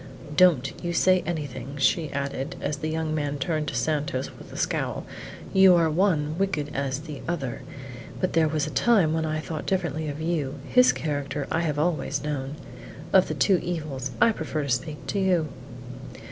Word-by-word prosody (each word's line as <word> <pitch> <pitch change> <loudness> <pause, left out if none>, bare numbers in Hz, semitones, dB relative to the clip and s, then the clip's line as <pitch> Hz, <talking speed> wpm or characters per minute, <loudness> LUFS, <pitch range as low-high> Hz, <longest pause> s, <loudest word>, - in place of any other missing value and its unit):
"Don't 165 -7 +4
you 175 0 -1
say 185 +1 +4
anything," 140 -5 -4
she 145 +3 +2
added, 140 0 -3
as 145 - -2
the 155 - -3
young 160 0 -1
man 145 -2 -1
turned 155 0 -1
on - - -6
Santos 140 0 -1
with - - -12
a - - -8
scowl; - - -1 0.5
"you 190 -1 +7
are 165 -2 +3
one 160 -4 +2
as 165 - -6
wicked 155 -7 -1
as 140 0 -1
the 150 -3 -8
other, 145 -8 -3 0.6
but 185 - 0
there 165 -1 +4
was 150 -1 0
a 155 - -5
time 200 -10 +3
when 160 0 0
I 155 0 -1
thought 155 0 -5
differently 160 -5 -1
of 145 0 -4
you: 155 -4 -1
his 250 0 +6
character 145 -2 -3
I 160 - +1
have 155 -4 -1
always 150 -3 0
known. 145 -1 -3 0.6
Of - - +6
the - - -3
two 190 -4 +3
evils, 150 -7 -3
I 230 - +6
prefer 155 -6 -3
to 140 - -4
speak 135 +5 -2
to 200 - -1
you." 180 -5 +2
155 Hz, 190 wpm, -26 LUFS, 145-170 Hz, 0.6 s, you